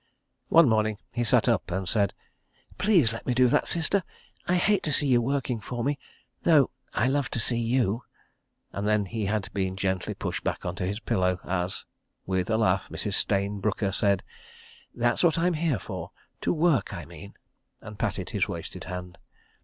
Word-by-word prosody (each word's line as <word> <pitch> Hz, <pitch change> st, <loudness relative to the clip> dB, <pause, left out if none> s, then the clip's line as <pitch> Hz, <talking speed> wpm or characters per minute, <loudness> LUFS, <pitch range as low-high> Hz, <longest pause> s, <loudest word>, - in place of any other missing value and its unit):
One 165 Hz, -2 st, +7 dB
morning 110 Hz, -2 st, +2 dB, 0.2 s
he 120 Hz, 0 st, 0 dB
sat 115 Hz, -, +3 dB
up -, -, +1 dB
and 95 Hz, +1 st, -2 dB
said: 100 Hz, -1 st, +1 dB, 0.6 s
"Please 175 Hz, -, +4 dB
let 115 Hz, -, -8 dB
me 125 Hz, -, +1 dB
do 125 Hz, 0 st, +5 dB
that, -, -, +2 dB
Sister—I 180 Hz, +1 st, -2 dB
hate 195 Hz, +2 st, +3 dB
to 155 Hz, -, -2 dB
see 145 Hz, -, +4 dB
you 125 Hz, -3 st, +4 dB
working 130 Hz, -2 st, -1 dB
for 120 Hz, +2 st, -4 dB
me—though 145 Hz, +1 st, +1 dB, 0.2 s
I 120 Hz, -, +2 dB
love 140 Hz, 0 st, +1 dB
to -, -, -2 dB
see 115 Hz, +2 st, +1 dB
you.. 115 Hz, -1 st, +1 dB, 0.4 s
." -, -, -47 dB
and 100 Hz, +1 st, -2 dB
then 105 Hz, -1 st, +2 dB
had 105 Hz, -1 st, -2 dB
been 95 Hz, -2 st, -1 dB
gently 95 Hz, -2 st, -1 dB
pushed -, -, -4 dB
back -, -, -2 dB
on 90 Hz, -, -2 dB
to 90 Hz, -, -2 dB
his 100 Hz, +3 st, -2 dB
pillow 90 Hz, -4 st, 0 dB
as, 90 Hz, 0 st, -1 dB, 0.4 s
with 95 Hz, -1 st, -1 dB
a 110 Hz, -, +2 dB
laugh, 100 Hz, -4 st, +1 dB
Mrs. -, -, -3 dB
Stayne 100 Hz, 0 st, 0 dB
Brooker 100 Hz, 0 st, 0 dB
said: 100 Hz, 0 st, +2 dB, 0.7 s
"That's 120 Hz, 0 st, +1 dB
what 170 Hz, -3 st, +4 dB
I'm 175 Hz, +2 st, +2 dB
here 155 Hz, -5 st, +1 dB
for—to -, -, -6 dB
work 155 Hz, -, +2 dB
I 85 Hz, -, -6 dB
mean," 85 Hz, +4 st, -11 dB, 0.4 s
and 105 Hz, -2 st, -11 dB
patted -, -, -2 dB
his -, -, +1 dB
wasted -, -, -6 dB
hand. 90 Hz, -1 st, -7 dB
110 Hz, 175 wpm, -27 LUFS, 95-135 Hz, 0.7 s, One